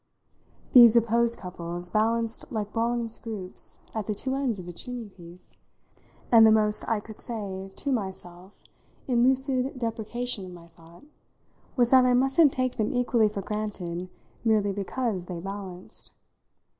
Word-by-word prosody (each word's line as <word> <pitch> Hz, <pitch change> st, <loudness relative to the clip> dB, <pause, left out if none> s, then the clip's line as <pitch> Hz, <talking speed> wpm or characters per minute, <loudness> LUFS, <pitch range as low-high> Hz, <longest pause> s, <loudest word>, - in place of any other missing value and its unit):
These 240 Hz, -3 st, +9 dB
opposed 235 Hz, 0 st, +4 dB
couples 175 Hz, -1 st, -3 dB
balanced 225 Hz, +2 st, -1 dB
like 210 Hz, -2 st, -4 dB
bronze 230 Hz, 0 st, -1 dB
groups 205 Hz, -5 st, -5 dB, 0.2 s
at 215 Hz, -3 st, -4 dB
the 210 Hz, -, -1 dB
two 260 Hz, +6 st, -1 dB
ends 270 Hz, -5 st, -1 dB
of 180 Hz, -2 st, -9 dB
a 175 Hz, -, -7 dB
chimney 245 Hz, +3 st, -6 dB
piece, 175 Hz, -1 st, -12 dB, 0.7 s
and 230 Hz, -2 st, +8 dB
the 220 Hz, -, +7 dB
most 215 Hz, -1 st, +2 dB
I 225 Hz, -2 st, +1 dB
could 215 Hz, +1 st, -12 dB
say 195 Hz, -4 st, -6 dB
to 280 Hz, -, -1 dB
myself 190 Hz, -5 st, -5 dB, 0.6 s
in 245 Hz, -3 st, +2 dB
lucid 265 Hz, +1 st, +2 dB
deprecation 230 Hz, -1 st, -2 dB
of 185 Hz, -1 st, -9 dB
my 170 Hz, -1 st, -14 dB
thought 165 Hz, +3 st, -18 dB, 0.7 s
was 240 Hz, -2 st, +2 dB
that 260 Hz, -1 st, +7 dB
I 250 Hz, 0 st, +4 dB
mustn't 270 Hz, +4 st, +4 dB
take 255 Hz, -1 st, -2 dB
them 215 Hz, -2 st, 0 dB
equally 240 Hz, -3 st, +2 dB
for 200 Hz, -2 st, -6 dB
granted 185 Hz, -5 st, -4 dB, 0.3 s
merely 215 Hz, -3 st, +2 dB
because 200 Hz, 0 st, -3 dB
they 180 Hz, -2 st, -6 dB
balanced. 190 Hz, -1 st, -8 dB
220 Hz, 150 wpm, -26 LUFS, 190-240 Hz, 0.7 s, These